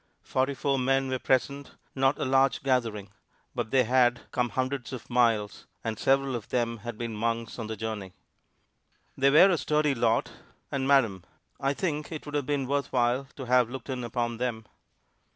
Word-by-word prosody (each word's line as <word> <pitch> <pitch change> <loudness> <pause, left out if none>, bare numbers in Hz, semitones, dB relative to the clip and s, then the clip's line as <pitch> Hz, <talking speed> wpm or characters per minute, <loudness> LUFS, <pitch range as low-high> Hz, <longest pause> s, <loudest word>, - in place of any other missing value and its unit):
Forty 135 +2 0
four 135 +1 0
men 135 +1 +1
were 130 -1 -1
present 140 +3 0 0.2
not 135 +1 +2
a - - -2
large 135 +2 +2
gathering, 115 -7 0 0.4
but - - -3
they 130 +1 +4
had 125 0 +3
come 125 -1 0
hundreds 130 0 -2
of 130 -1 -8
miles, 115 -4 +1 0.2
and 110 -2 -3
several 135 0 +2
of 110 -4 -6
them 115 -1 0
had 115 +1 -7
been 115 -1 -4
months 115 +2 -2
on 110 - -4
the 110 - -4
journey. 105 -4 -5 1.0
They 135 +1 +4
were 170 +7 +7
a 170 - +1
sturdy 150 -1 +1
lot; 115 -2 +1 0.4
and 135 -1 -1
madam! 115 -10 +3 0.4
I 135 +1 0
think 150 -4 -2
it 155 - -6
would 145 - -8
have 145 -3 -1
been 145 -2 0
worth 140 +1 -1
while 125 +2 +1
to 135 - -7
have 125 -1 +3
looked 130 +1 -6
in 125 -1 -3
upon 120 0 -2
them. 115 -2 -3
125 Hz, 185 wpm, -28 LUFS, 115-135 Hz, 1.0 s, were